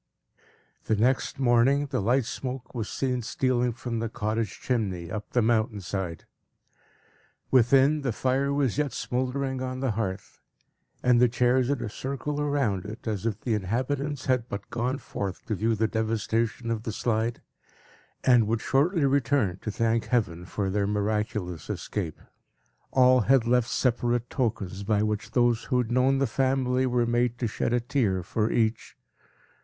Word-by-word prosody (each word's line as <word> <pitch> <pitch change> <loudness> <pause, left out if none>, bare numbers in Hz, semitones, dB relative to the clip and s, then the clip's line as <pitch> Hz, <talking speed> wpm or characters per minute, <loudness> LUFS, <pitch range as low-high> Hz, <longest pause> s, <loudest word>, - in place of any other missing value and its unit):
The 110 - +2
next 125 +5 +1
morning, 130 +2 +3
the 130 -5 0
light 125 +5 +2
smoke 130 +1 -5
was 115 -4 -3
seen 125 -2 -1
stealing 125 +1 0
from 120 -1 -4
the 115 0 -2
cottage 110 -2 -2
chimney, 95 -9 -2
up 105 -1 -5
the 120 - +2
mountain 110 -2 +1
side. 90 -2 -4 1.3
Within, 135 +4 +5
the 130 -3 -1
fire 135 +4 0
was 140 -2 0
yet 145 -3 0
smouldering 130 +1 -2
on 130 0 -3
the 130 -2 0
hearth, 100 -3 -4 0.6
and 125 -1 +4
the 125 - +5
chairs 125 +1 +2
in 140 -3 0
a - - -3
circle 140 +6 -3
round 135 -10 0
it, 110 +3 -8
as 110 0 -1
if 110 -1 -3
the 120 - -1
inhabitants 130 +8 -2
had 125 -2 +1
but 100 0 -6
gone 125 +3 -1
forth 100 -8 -5
to 115 - -2
view 110 +3 +1
the 110 +1 +1
devastation 110 +1 -1
of 115 -2 -1
the 110 - -4
Slide, 115 +1 -1 0.8
and 120 -4 +5
would 110 0 0
shortly 150 +3 +2
return, 135 -8 +1
to - - -4
thank 115 0 0
Heaven 90 -9 -1
for 95 +1 -2
their 100 0 0
miraculous 105 -5 -2
escape. 85 -7 -4 0.7
All 130 -1 +5
had 125 +1 +3
left 120 0 +2
separate 120 -1 0
tokens, 105 -7 -2
by 105 +1 +1
which 105 -1 -2
those 120 -2 +2
who 125 - 0
had 120 -2 0
known 130 +2 +3
the 135 - +2
family 130 +1 +1
were 120 -1 +2
made 120 0 +1
to 120 - -2
shed 115 +1 -1
a 120 - +3
tear 115 -7 0
for 110 +4 -1
each. 110 -1 0
120 Hz, 165 wpm, -27 LUFS, 110-130 Hz, 1.3 s, Within